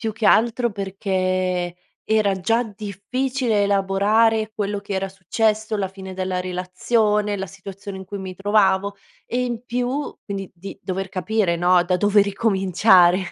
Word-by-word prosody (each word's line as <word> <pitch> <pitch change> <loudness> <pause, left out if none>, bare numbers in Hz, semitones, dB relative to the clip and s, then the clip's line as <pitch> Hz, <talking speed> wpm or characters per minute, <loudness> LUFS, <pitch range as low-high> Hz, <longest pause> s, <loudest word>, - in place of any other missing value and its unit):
Più 225 -1 -2
che 220 0 -1
altro 235 +1 +3
perché 185 -2 -1 0.3
era 215 -2 +2
già 225 +6 +2
difficile 220 +3 -2
elaborare 205 +3 +2
quello 205 -1 -2
che 200 0 -7
era 195 0 -1
successo, 215 +3 -1
la 200 -2 -1
fine 190 0 -9
della 185 0 -2
relazione, 205 +4 0
la 195 0 -4
situazione 195 +1 -9
in 190 - -8
cui 200 +2 -7
mi 190 -1 -6
trovavo, 200 0 +2 0.3
e 250 +1 -1
in 240 -2 -4
più 250 +4 -2
quindi 195 -2 -5
di 190 +3 -9
dover 190 +1 -3
capire, 190 0 0
no, 175 +1 +4
da 180 0 +1
dove 205 +2 +4
ricominciare, 190 -3 +4
200 Hz, 150 wpm, -22 LUFS, 190-220 Hz, 0.3 s, no